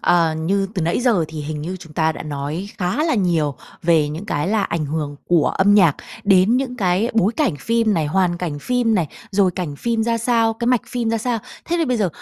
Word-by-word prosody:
ờ, 165 Hz, -2 st, +3 dB
như 190 Hz, +5 st, 0 dB
từ 185 Hz, -, -1 dB
nãy 165 Hz, +8 st, 0 dB
giờ 230 Hz, -9 st, +2 dB
thì 155 Hz, -1 st, -6 dB
hình 150 Hz, 0 st, -5 dB
như 180 Hz, +4 st, -4 dB
chúng 165 Hz, -3 st, -13 dB
ta 160 Hz, +1 st, +1 dB
đã -, -, -7 dB
nói 150 Hz, +5 st, -4 dB
khá 185 Hz, -, 0 dB
là 325 Hz, -, +1 dB
nhiều 170 Hz, -, +1 dB, 0.3 s
về 160 Hz, -3 st, +3 dB
những 160 Hz, +7 st, -6 dB
cái 150 Hz, -4 st, -1 dB
là 210 Hz, 0 st, +1 dB
ảnh 165 Hz, -5 st, -2 dB
hưởng 145 Hz, -1 st, -3 dB
của 170 Hz, -3 st, +3 dB
âm 200 Hz, +2 st, +3 dB
nhạc 175 Hz, -8 st, +5 dB, 0.3 s
đến 200 Hz, +4 st, +4 dB
những 255 Hz, -1 st, -2 dB
cái 190 Hz, +1 st, +1 dB
bối 220 Hz, -1 st, +3 dB
cảnh 260 Hz, -, +1 dB
phim 230 Hz, +1 st, +1 dB
này, 155 Hz, -4 st, 0 dB
hoàn 180 Hz, +2 st, +1 dB
cảnh 165 Hz, -5 st, -3 dB
phim 240 Hz, -, +1 dB
này, 175 Hz, -6 st, +1 dB, 0.2 s
rồi 195 Hz, -2 st, +3 dB
cảnh 160 Hz, -6 st, -4 dB
phim 230 Hz, +5 st, -1 dB
ra 230 Hz, 0 st, 0 dB
sao, 230 Hz, -1 st, +2 dB
cái 235 Hz, +1 st, -4 dB
mạch 250 Hz, -2 st, +3 dB
phim 235 Hz, -2 st, -1 dB
ra 230 Hz, -, 0 dB
sao. 235 Hz, +1 st, -1 dB, 0.3 s
Thế 345 Hz, -, -1 dB
thì 330 Hz, -, +2 dB
bây 250 Hz, -3 st, 0 dB
giờ 205 Hz, -4 st, +1 dB
190 Hz, 240 wpm, -20 LUFS, 160-230 Hz, 0.3 s, nhạc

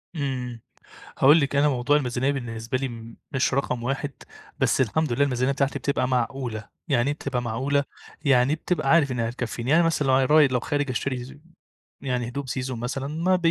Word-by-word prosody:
امم، 125 Hz, -5 st, -3 dB, 0.6 s
هاقول 150 Hz, +5 st, +7 dB
لِك 140 Hz, 0 st, -1 dB
أنا 145 Hz, +1 st, +4 dB
موضوع 130 Hz, +2 st, +2 dB
الميزانية 130 Hz, 0 st, 0 dB
بالنسبة 120 Hz, -2 st, -3 dB
لي 115 Hz, -3 st, -6 dB, 0.2 s
مش 130 Hz, -1 st, +1 dB
رقم 125 Hz, -3 st, -1 dB
1 135 Hz, +3 st, -2 dB, 0.5 s
بس -, -, +2 dB
الحمد 135 Hz, +3 st, +1 dB
لله 145 Hz, -, +2 dB
الميزانية 130 Hz, -1 st, +1 dB
بتاعتي 140 Hz, 0 st, 0 dB
بتبقى 135 Hz, -1 st, 0 dB
معقولة، 125 Hz, -3 st, -2 dB, 0.2 s
يعني 130 Hz, -3 st, +2 dB
إيه -, -, +1 dB
بتبقى 130 Hz, -4 st, -3 dB
معقولة 135 Hz, +5 st, 0 dB, 0.4 s
يعني 135 Hz, +2 st, +4 dB
بتبقى 175 Hz, +2 st, -1 dB
عارف 155 Hz, -5 st, +4 dB
إنها 115 Hz, -2 st, -1 dB
هتكفيني 120 Hz, +1 st, -4 dB
يعني 170 Hz, +2 st, +5 dB
مثلًا 160 Hz, -4 st, +1 dB
لو 130 Hz, -, +4 dB, 0.2 s
راي 150 Hz, -2 st, +7 dB
لو 125 Hz, -2 st, 0 dB
خارج 145 Hz, 0 st, -1 dB
أشتري 130 Hz, +2 st, -3 dB, 0.6 s
يعني 125 Hz, -3 st, -2 dB
هدوم 140 Hz, +2 st, -5 dB
season 130 Hz, 0 st, -3 dB
مثلًا 125 Hz, +3 st, -3 dB
ما 175 Hz, +5 st, +1 dB
130 Hz, 175 wpm, -25 LUFS, 125-140 Hz, 0.6 s, هاقول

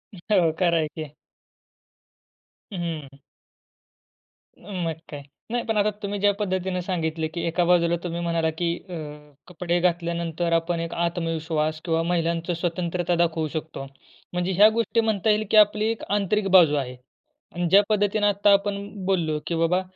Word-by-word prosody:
हो, 180 Hz, -2 st, +2 dB
खरं 170 Hz, -2 st, +3 dB
आहे 155 Hz, -1 st, +1 dB
की. 155 Hz, -1 st, -8 dB, 1.6 s
हं. 190 Hz, -, -5 dB, 0.3 s
हं. 140 Hz, -, -19 dB, 1.4 s
मग 175 Hz, -4 st, -4 dB, 0.2 s
काय. 145 Hz, -1 st, -7 dB, 0.3 s
नाही 240 Hz, 0 st, -1 dB
पण 225 Hz, -1 st, -1 dB
आता 205 Hz, 0 st, +3 dB
तुम्ही 200 Hz, 0 st, -3 dB
ज्या 205 Hz, +1 st, +3 dB
पद्धतीनं 185 Hz, -2 st, -2 dB
सांगितले, 160 Hz, -3 st, -2 dB
की 165 Hz, +2 st, -6 dB
एका 170 Hz, +2 st, +1 dB
बाजूला 170 Hz, -1 st, +3 dB
तुम्ही 170 Hz, -1 st, -3 dB
म्हणालात 165 Hz, -1 st, 0 dB
की 170 Hz, 0 st, 0 dB
अ, 180 Hz, -, -7 dB, 0.5 s
कपडे 175 Hz, 0 st, -1 dB
घातल्यानंतर 170 Hz, -1 st, -1 dB
आपण 165 Hz, +1 st, 0 dB
एक 165 Hz, 0 st, -4 dB
आत्मविश्वास 165 Hz, -2 st, -1 dB
किंवा 165 Hz, -1 st, +1 dB
महिलांचं 170 Hz, 0 st, -1 dB
स्वतंत्रता 175 Hz, 0 st, -1 dB
दाखवू 165 Hz, -2 st, +1 dB
शकतो. 155 Hz, -2 st, -6 dB, 0.5 s
म्हणजे 180 Hz, +1 st, -1 dB
ह्या 205 Hz, +4 st, +7 dB
गोष्टी 230 Hz, +1 st, 0 dB
म्हणता 220 Hz, -1 st, 0 dB
येईल 215 Hz, +1 st, +2 dB
की 220 Hz, -, +5 dB
आपली 210 Hz, 0 st, +5 dB
एक 225 Hz, -, -6 dB
आंतरिक 205 Hz, 0 st, +1 dB
बाजू 170 Hz, -6 st, +6 dB
आहे. 130 Hz, -3 st, -3 dB, 0.6 s
आणि 175 Hz, 0 st, 0 dB
ज्या 195 Hz, +3 st, +7 dB
पद्धतीनं 205 Hz, 0 st, +2 dB
आता 205 Hz, 0 st, +3 dB
आपण 200 Hz, 0 st, +1 dB, 0.3 s
बोललो, 165 Hz, -5 st, 0 dB
की 170 Hz, -, -1 dB
बाबा, 165 Hz, +3 st, +2 dB
175 Hz, 155 wpm, -24 LUFS, 165-200 Hz, 1.6 s, ह्या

